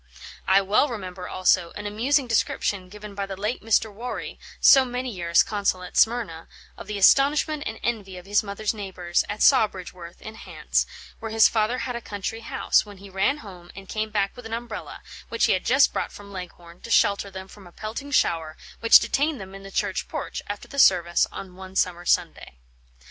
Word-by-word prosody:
I 195 +1 +5
well 205 +9 +3
remember, 185 -5 -6
also, 180 -2 +2
an 210 - -7
amusing 255 +7 +1
description 205 -4 -1
given 210 +1 -10
by 200 0 -4
the 195 -1 -6
late 210 +5 -2
Mr. 220 -1 +1
Warry, 240 +5 -6 0.2
so 270 - +7
many 250 0 -4
years 170 -4 +3
consul 200 -3 -1
at 180 - -10
Smyrna, 220 -9 +1 0.3
of - - -11
the 210 - -4
astonishment 290 - +4
and 220 - -6
envy 205 -5 -3
of 180 - -11
his 205 +1 +2
mother's 205 +1 -3
neighbours, 185 -4 -2
at 205 +1 -4
Sawbridgeworth, 185 -8 +1
in 215 - -9
Hants, 220 - -2 0.3
where 225 - -5
his 220 0 +6
father 220 +2 0
had 250 -1 -4
a 235 - -4
country 205 +1 -5
house, 230 - +1
when 205 -2 -13
he 195 +1 -13
ran 195 +10 +1
home 180 -3 -12
and 195 -1 -10
came 215 +2 -3
back 200 -2 -1
with 245 -3 -9
an 225 - -3
umbrella, 230 -2 -7 0.3
which - - +2
he - - +3
had - - -2
just - - +4
brought - - -2
from 200 0 -12
Leghorn, 175 -2 -10
to - - -10
shelter 200 -3 +3
them 190 0 -9
from 195 -1 -14
a - - -15
pelting 220 +9 -6
shower 165 - +1 0.2
which 230 - +8
detained 290 -1 0
them 190 -1 -9
in 195 - -9
the 195 - -10
church 195 -1 -2
porch, - - -5
after 205 0 -6
the 280 - -5
service, 175 -7 +4
on 185 -2 -9
one 190 0 -11
summer 175 -2 0
Sunday. - - 0
205 Hz, 200 wpm, -24 LUFS, 185-225 Hz, 0.3 s, which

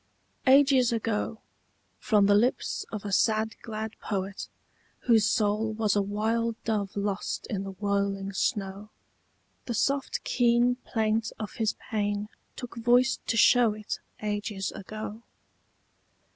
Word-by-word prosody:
Ages 270 -2 +6
ago, 225 -1 -2 0.6
from 210 -3 +3
the 205 - +5
lips 230 +5 +1
of 210 -2 -5
a 200 - -3
sad 220 +2 +2
glad 220 -1 -5
poet 195 -1 -4 0.5
Whose 225 -3 +4
soul 215 0 +1
was 215 -2 +1
a 205 - +3
wild 220 +3 -1
dove 205 -3 -2
lost 200 0 -2
in 195 -2 -2
the 195 - -6
whirling 200 0 -1
snow, 200 -1 -2 0.8
The 235 - -2
soft 275 +4 0
keen 245 0 +3
plaint 220 0 0
of 215 -3 -6
his 220 -2 -1 0.2
pain 205 -1 -1 0.3
took 245 -2 -8
voice 245 +3 +3
to 230 - 0
show 235 -1 +5
it 215 0 -5 0.2
Ages 205 -2 -2
ago. 215 +2 -7
215 Hz, 130 wpm, -28 LUFS, 205-230 Hz, 0.8 s, Ages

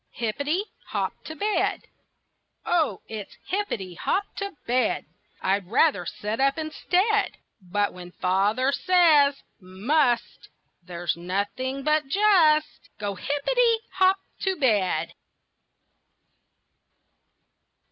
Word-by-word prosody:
HIPPITY 285 - -1 0.2
HOP - - -2
TO 315 - -8
BED 415 +4 0 0.8
O 315 - +1
it's 215 -3 -8
hippity 295 - -3
hop 385 - 0
to 400 0 -4
bed! 250 +2 +1 0.4
I'd 195 -1 +1
rather 220 - +2
sit 210 +6 -4
up 275 +2 +2
instead. 365 +7 0 0.2
But 205 +3 -1
when 180 -1 -10
father 205 +8 +1
says 310 -5 +4 0.2
"must," 240 +7 0 0.3
There's 175 -1 -3
nothing 205 +10 -3
but 305 -1 +2
just 325 -4 +3
Go 205 -1 -3
hippity 450 - +1
hop 375 0 +3 0.2
to 385 -1 0
bed. 200 - +1
270 Hz, 95 wpm, -25 LUFS, -, 0.8 s, says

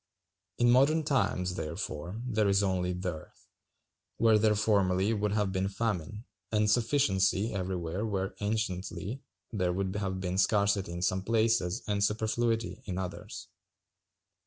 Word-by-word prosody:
In 120 0 +4
modern 145 +6 +4
times, 90 -11 0
therefore, 85 +4 -5
there 110 -4 +1
is 100 +1 +3
only 90 -2 0
dearth, 90 -3 -6 0.7
where 110 -2 +5
there 105 0 +3
formerly 100 -1 +2
would 105 -1 0
have 105 -2 +1
been 95 +1 -1
famine, 105 0 -3 0.3
and 105 -1 +2
sufficiency 110 -4 +2
everywhere 90 -1 -3
when 95 -3 -2
anciently 105 +2 -3 0.3
there 90 -4 +1
would 95 +1 -2
have 95 -2 -2
been 95 0 -2
scarcity 100 -2 +2
in 85 +1 -4
some 95 +1 +1
places 110 -1 +1
and 100 -1 0
superfluity 115 +2 0
in 90 -3 -4
others. 95 -1 -6
100 Hz, 135 wpm, -30 LUFS, 95-110 Hz, 0.7 s, where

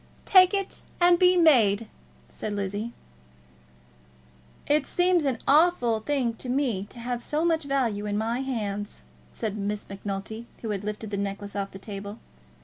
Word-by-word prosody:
"Take 370 -2 +7
it 395 -1 -3 0.2
and 350 0 +5
be 360 0 +5
made," 230 - +5 0.4
said 215 - -5
Lizzie. 205 +3 -3 1.7
"It 295 -1 +2
seems 355 -3 +2
an 265 -4 0
awful 285 -7 +4
thing 250 -1 0
to 250 - -6
me 245 -7 0
to - - -13
have 240 0 -3
so 305 +6 -1
much 325 -3 +1
value 235 -7 0
in 205 0 -1
my 225 +3 -1
hands," 210 -6 -4 0.3
said 215 -3 -3
Miss 205 0 -3
Macnulty, 200 +3 -6 0.2
who 220 - -2
had 200 -1 -3
lifted 210 0 -5
the 200 - -2
necklace 200 0 -4
off 200 -1 -2
the 195 - -10
table. 200 +1 -7
230 Hz, 155 wpm, -26 LUFS, 205-285 Hz, 1.7 s, Take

